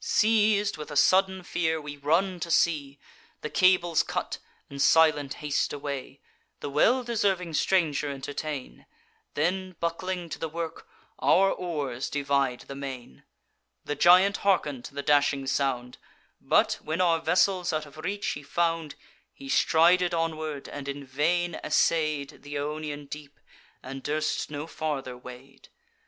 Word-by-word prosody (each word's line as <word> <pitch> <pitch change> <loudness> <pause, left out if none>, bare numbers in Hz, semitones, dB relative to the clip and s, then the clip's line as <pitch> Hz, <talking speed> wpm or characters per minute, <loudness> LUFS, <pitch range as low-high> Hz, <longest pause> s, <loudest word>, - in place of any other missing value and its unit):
"Seiz'd 210 -2 +3
with 150 0 -7
a 145 - -7
sudden 190 +4 +3
fear, 160 -2 -1
we 145 -1 -7
run 170 +6 +1
to 170 - -4
sea, 150 -4 +1 0.4
The 150 - -5
cables 180 -3 +4
cut, - - -4 0.3
and 140 0 -6
silent 150 -3 +4
haste 150 0 0
away; 140 -2 -6 0.4
The 145 - -5
well 240 - +3
deserving 195 -7 0
stranger 155 -5 +1
entertain; 140 0 -6 0.5
Then, 185 +4 -1
buckling 175 +1 -3
to - - -6
the 160 - -3
work, 165 0 -6 0.3
our 195 +1 +4
oars 145 -8 -3
divide 140 -3 0
the - - -9
main. 130 - -8 0.6
The 145 - -2
giant 180 +6 +5
harken'd 150 -10 0
to 140 - -10
the 140 - -3
dashing 140 -1 +2
sound: 130 -2 -1 0.4
But, - - +2
when 155 +3 -3
our 170 -3 +3
vessels 180 +1 +2
out 155 -1 -2
of 145 +1 -15
reach 200 +6 -4
he 145 - -4
found, 165 +1 -1 0.4
He 135 - -11
strided 175 +4 +4
onward, 155 -3 -3
and 145 -1 -7
in 140 0 -5
vain 165 +6 0
essay'd 155 -2 +1
Th' 145 - -15
Ionian 150 0 -4
deep, 145 0 -10 0.4
and 135 +1 -7
durst 155 +2 -1
no 145 0 -5
farther 145 -6 -4
wade. 125 +2 -13
155 Hz, 145 wpm, -27 LUFS, 140-175 Hz, 0.6 s, giant